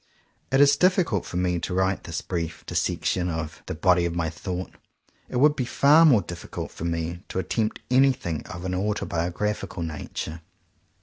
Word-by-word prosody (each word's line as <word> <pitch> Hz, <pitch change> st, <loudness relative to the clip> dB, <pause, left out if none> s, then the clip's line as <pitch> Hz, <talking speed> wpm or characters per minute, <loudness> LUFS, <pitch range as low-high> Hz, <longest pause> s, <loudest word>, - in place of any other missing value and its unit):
If -, -, +2 dB
it 135 Hz, -, +6 dB
is 145 Hz, 0 st, +6 dB
difficult 180 Hz, -, +2 dB
for 90 Hz, -, -4 dB
me 90 Hz, -1 st, +1 dB
to 90 Hz, -, -3 dB
write 95 Hz, 0 st, 0 dB
this 85 Hz, 0 st, -4 dB
brief 85 Hz, -3 st, -4 dB
dissection 90 Hz, -1 st, 0 dB
of 80 Hz, -2 st, -4 dB
"the -, -, -3 dB
body 90 Hz, +1 st, +3 dB
of 85 Hz, 0 st, -2 dB
my 80 Hz, -2 st, -1 dB
thought," 90 Hz, +2 st, -5 dB, 0.6 s
it -, -, -6 dB
would 145 Hz, +4 st, +5 dB
be 130 Hz, -, -1 dB
far 145 Hz, +6 st, +5 dB
more 120 Hz, -, +5 dB
difficult 85 Hz, 0 st, -7 dB
for 85 Hz, -, -7 dB
me 85 Hz, +1 st, -2 dB
to -, -, -5 dB
attempt 110 Hz, +4 st, -1 dB
anything 130 Hz, -, +2 dB
of 90 Hz, 0 st, -7 dB
an 95 Hz, -, -2 dB
autobiographical 95 Hz, -1 st, -2 dB
nature. 80 Hz, +1 st, -5 dB
90 Hz, 175 wpm, -25 LUFS, 85-115 Hz, 0.6 s, it